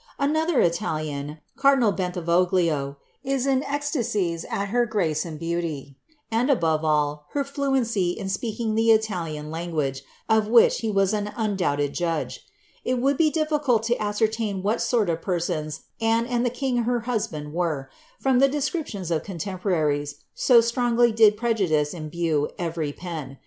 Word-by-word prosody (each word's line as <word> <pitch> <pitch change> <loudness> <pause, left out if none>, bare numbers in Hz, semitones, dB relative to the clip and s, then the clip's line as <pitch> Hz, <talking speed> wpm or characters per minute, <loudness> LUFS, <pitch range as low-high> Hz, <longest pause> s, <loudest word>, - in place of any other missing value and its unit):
^' - - -31
Another 315 +2 +1
Ita 170 0 +1
lian, 150 -1 -3 0.2
cardinal 275 -5 +4
Bentivoglio, 175 -5 0 0.3
is 270 -1 -1
in 265 -1 +2
ecstasies 230 - -1
at 200 0 -2
her 240 +2 +2
grace 175 -9 0
and 160 -2 -6
beauty, 165 -4 -3 0.4
and, 235 +5 +1
ebove 165 - +2
all, 150 -1 0
her 285 - +1
fluency 260 -10 0
in 195 - -5
speaking 220 +3 -2
the 225 +1 +2
Italian 175 -9 +1
language, 155 -5 -2 0.3
of 220 -1 +3
which 230 +1 +5
he 225 - -2
was 195 -1 +2
en 210 -1 -2
undoubted 175 -10 0
judge. 165 -3 -2 0.4
It 255 - 0
would 275 +3 +2
be 315 +2 +3
difficult 300 -7 +1
to 240 +2 +1
ascertain 210 -1 -1
what 215 +4 0
sort 230 -5 +1
of 165 -1 -1
persons 160 -5 -2 0.2
Anne 225 +1 +2
and 240 -1 0
the 245 - +2
king, 250 +1 -2
her 240 0 0
husband, 170 -11 -3
were, 160 -6 -1 0.3
from 265 -2 +2
the 275 +1 +5
descriptions 275 - -3
of 160 - +1
contemporaries, 165 -6 -2 0.2
so 240 -3 +5
strongly 240 0 +2
did 215 -1 +5
prejudice 190 -11 +1
imbue 155 -2 -1
every 165 -4 -2
pen. 155 -5 -7
200 Hz, 155 wpm, -24 LUFS, 160-240 Hz, 0.4 s, which